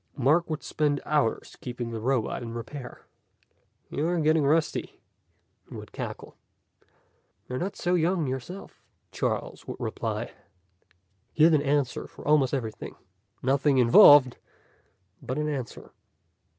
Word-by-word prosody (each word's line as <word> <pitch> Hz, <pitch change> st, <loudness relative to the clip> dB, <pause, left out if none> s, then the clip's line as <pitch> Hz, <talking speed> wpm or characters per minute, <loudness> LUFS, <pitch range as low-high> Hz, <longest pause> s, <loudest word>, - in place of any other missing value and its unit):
Mark 155 Hz, +6 st, +2 dB
would 155 Hz, -2 st, -4 dB
spend 145 Hz, -2 st, 0 dB
hours 145 Hz, -7 st, -1 dB
keeping 120 Hz, -2 st, -5 dB
the 115 Hz, -, -4 dB
robot 125 Hz, 0 st, -1 dB
in 115 Hz, -1 st, -7 dB
repair. 125 Hz, +2 st, -8 dB, 0.9 s
"You're 170 Hz, +4 st, 0 dB
getting 155 Hz, 0 st, +3 dB
rusty," 155 Hz, +3 st, 0 dB, 0.7 s
he -, -, -10 dB
would -, -, -10 dB
cackle. -, -, -7 dB, 1.1 s
"You're 125 Hz, 0 st, -4 dB
not 195 Hz, +3 st, -3 dB
so 175 Hz, -, -1 dB
young 175 Hz, -1 st, +1 dB
yourself," 135 Hz, +9 st, -7 dB, 0.3 s
Charles -, -, -3 dB
would -, -, -7 dB
reply. -, -, -4 dB, 1.0 s
He 155 Hz, -, +3 dB
had 165 Hz, +1 st, +6 dB
an 150 Hz, -, +4 dB
answer 140 Hz, -3 st, -1 dB
for -, -, -12 dB
almost 145 Hz, -4 st, +4 dB
everything. 115 Hz, -6 st, -5 dB, 0.5 s
Nothing 135 Hz, +1 st, +2 dB
involved, 130 Hz, +2 st, +7 dB, 0.8 s
but 130 Hz, -, -4 dB
an 150 Hz, 0 st, -1 dB
answer. 135 Hz, -5 st, -5 dB
145 Hz, 125 wpm, -27 LUFS, 125-155 Hz, 1.1 s, involved